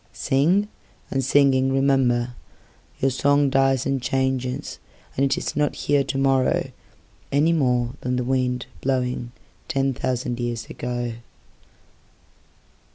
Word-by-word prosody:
Sing—and 150 -2 -1
singing—rememberYour 135 -2 +1
song 140 +1 +2
dies 135 -1 +2
and 135 -1 0
changesAnd 130 +1 -2
is - - -3
not 145 0 +1
here 145 -1 +1
to 135 - -3
morrowAny 135 +3 0
more 125 -5 +1
than 125 0 -1
the 125 - 0
windBlowing 125 0 -1 0.4
ten 135 -3 0
thousand 125 -1 -2
years 120 -2 -3
ago. 120 -1 -3
130 Hz, 90 wpm, -23 LUFS, 125-135 Hz, 0.4 s, song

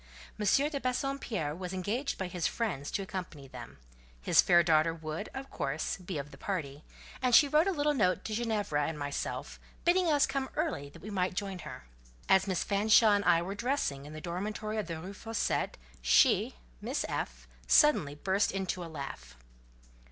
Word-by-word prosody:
M. 210 - -1 0.2
de 295 -2 -3
Bassompierre 250 - -2
was 180 +2 -6
engaged 210 +9 -2
by 190 - -2
his 180 -2 -1
friends 180 - -3
to 200 - -2
accompany 175 -7 -7
them; - - -10 0.4
his - - +5
fair 175 -1 +5
daughter 165 0 +3
would, 160 +5 -5
of 270 0 -7
course, 145 +3 -2
be 185 -3 -6
of 145 +1 -6
the - - -13
party, 150 -7 -4 0.4
and 250 -2 +4
she 290 - +8
wrote 305 +5 +3
a - - +3
little 295 -3 +1
note 185 -9 +1
to 215 - -3
Ginevra 210 -10 0
and 160 - -4
myself, 145 -1 -4 0.3
bidding 355 +1 +4
us 295 0 +4
come 270 -1 -2
early 295 - -2
that - - -15
we 215 - -6
might 185 -2 -1
join 195 -1 -3
her. - - -9 0.4
As 190 0 +4
Miss 185 -3 0
Fanshawe 215 +2 +5
and 205 0 +1
I 170 0 +4
were 190 +3 -4
dressing 200 - -2
in 150 - -10
the 155 - -7
dormitory 210 +5 -3
of 210 - -3
the 165 -2 -4
Rue 185 +5 -7
Fossette, 225 +2 -2 0.2
she - - +4 0.3
(Miss - - -2
F.) - - -4 0.2
suddenly 205 - +4
burst 190 +6 +1
into 190 -2 -3
a 165 - -7
laugh. 140 - -8
190 Hz, 185 wpm, -31 LUFS, 155-225 Hz, 0.4 s, she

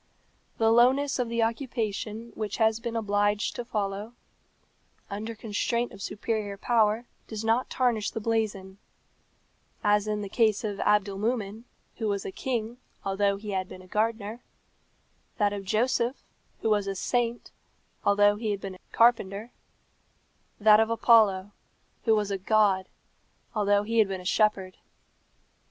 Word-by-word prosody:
The 225 0 +3
lowness 260 +4 +4
of 245 -2 0
the 235 0 +1
occupation 230 -2 -3
which 215 -1 -4
he 225 - +2
has 220 0 +3
been 235 0 -4
obliged 205 -1 0
to 245 - -4
follow, 210 -1 -3 1.0
under 220 +3 -5
constraint 235 +3 -1
of 195 - -12
superior 210 -1 -3
power, 225 +1 +2 0.2
does 220 0 -5
not 230 +3 +1
tarnish 235 -5 +1
the - - -5
blazon: 205 -4 -2 1.0
as 210 0 +3
in 210 -1 -1
the - - -4
case 215 0 +2
of 205 -2 -3
Abdolmumen, 210 +2 0 0.3
who 225 - -2
was 200 -1 -1
a - - -4
king, 235 0 -3 0.3
although 200 +1 +1
he 210 +1 -6
had 185 -1 -2
been 185 - -10
a - - -16
gardener; 220 +2 -1 1.0
that 205 -2 +2
of 200 -1 -5
Joseph, 235 +4 0 0.4
who 220 - +2
was 205 -2 +2
a 195 - -2
saint, 240 +4 -1 0.5
although 205 0 +4
he 220 0 -3
had 200 -1 -2
been 195 -1 -5
a 185 - -14
carpenter; 225 -1 +2 1.1
that 215 0 +7
of 220 0 +2
Apollo, 215 -4 +4 0.5
who 225 -2 +5
was 210 -1 -1
a 195 - -2
god, 195 -2 +2 0.7
although 205 -2 +2
he 230 +2 0
had 215 - +5
been 190 -1 -4
a - - -14
shepherd." 195 -2 +1
215 Hz, 150 wpm, -27 LUFS, 200-230 Hz, 1.1 s, that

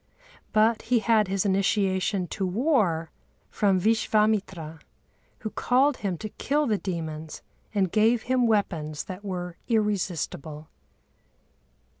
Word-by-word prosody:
But 220 +1 +3
he 250 - +4
had 220 -2 +3
his 195 +1 -1
initiation 195 -1 +1
to 195 - -4
war 190 - +1 0.4
from 195 -3 +2
Vishvâmitra, 210 -6 +1 0.6
who 215 - -4
called 265 +2 +2
him 190 -4 -3
to 215 - -6
kill 295 +7 0
the 215 -5 0
demons 160 -4 -5 0.3
and 190 -4 +1
gave 220 +2 +3
him 255 -1 +2
weapons 160 -9 0
that 185 +2 -8
were 180 -3 -5
irresistible. 180 - -2
200 Hz, 115 wpm, -26 LUFS, 180-220 Hz, 0.6 s, he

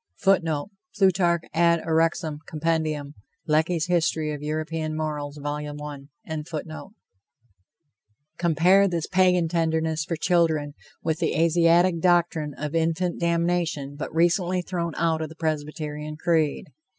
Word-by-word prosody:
[Footnote: 170 -4 +1 0.3
Plutarch 180 -4 +3
Ad 170 0 +3
Uxorem. 160 -1 0
Comp. 155 -2 -2 0.3
Lecky's 160 +1 +1
History 160 -3 0
of 145 - -6
European 155 +1 -3
Morals. 150 -2 -4
Vol. 145 0 -4
I.] 150 +2 -7 1.5
Compare 175 +4 +4
this 170 -4 -2
Pagan 180 -2 +3
tenderness 160 -1 0
for 165 - -3
children 160 -4 +1 0.3
with 160 -1 -1
the 165 - 0
Asiatic 170 +1 +4
doctrine 170 -4 +2
of 150 +1 -5
infant 165 +2 0
damnation 170 -4 0
but 150 - -5
recently 175 +2 +1
thrown 170 -3 -3
out 165 -1 +1
of 160 - -3
the 160 - -12
Presbyterian 150 -1 -4
creed. 160 -3 0
160 Hz, 115 wpm, -25 LUFS, 150-170 Hz, 1.5 s, Compare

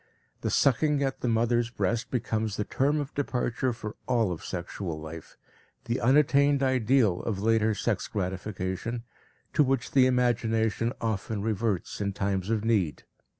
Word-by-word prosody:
The - - -1
sucking 140 +2 +3
at 135 -1 -2
the - - -1
mother's 120 +1 +2
breast 120 0 -1
becomes 110 -4 -1
the 105 - 0
term 145 +7 +1
of 145 0 -4
departure 130 -2 -1
for 110 -2 -6
all 115 -6 +2
of 85 - -5
sexual 85 -2 -5
life, 80 +1 -9 0.5
the 120 +2 -1
unattained 140 +2 +4
ideal 125 -6 +3
of 105 -4 -2
later 110 0 +2
sex 105 -2 -1
gratification, 95 +3 -3 0.5
to 150 - +4
which 130 -2 0
the 130 -2 +5
imagination 115 -3 +1
often 110 -1 -2
reverts 110 -3 -1
in 100 -1 -1
times 100 -1 -1
of 110 -1 0
need. 95 -11 +1
115 Hz, 150 wpm, -28 LUFS, 100-125 Hz, 0.5 s, the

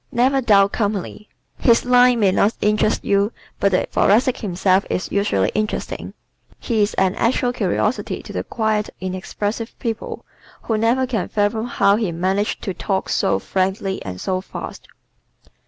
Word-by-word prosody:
Never 265 +3 +2
Dull 200 -5 +5
Company 210 0 -3 0.3
¶ - - -12
His 235 -1 +4
"line" 245 -1 +5
may 195 -2 +4
not 205 +3 +2
interest 210 +1 +1
you 200 +2 +2 0.3
but 200 - +2
the 185 - +2
Thoracic 240 +5 +2
himself 190 0 +1
is 185 - -2
usually 200 - +1
interesting. 215 0 -3 0.4
He 225 -3 -1
is 205 - +1
an 190 -1 +2
actual 245 +2 +1
curiosity 210 +2 -1
to - - -9
the - - -2
quiet, 220 -2 -1
inexpressive 205 +5 -4
people 230 -1 -5 0.4
who 225 - -1
never 230 +4 +2
can 230 -7 -2
fathom 220 +2 0
how 200 -4 +3
he 215 -6 -1
manages 190 +5 0
to 190 - -3
talk 190 +2 -2
so - - +1
frankly 190 0 -2
and 90 -1 -6
so 185 - -2
fast. - - -8
210 Hz, 155 wpm, -20 LUFS, 190-230 Hz, 0.4 s, Dull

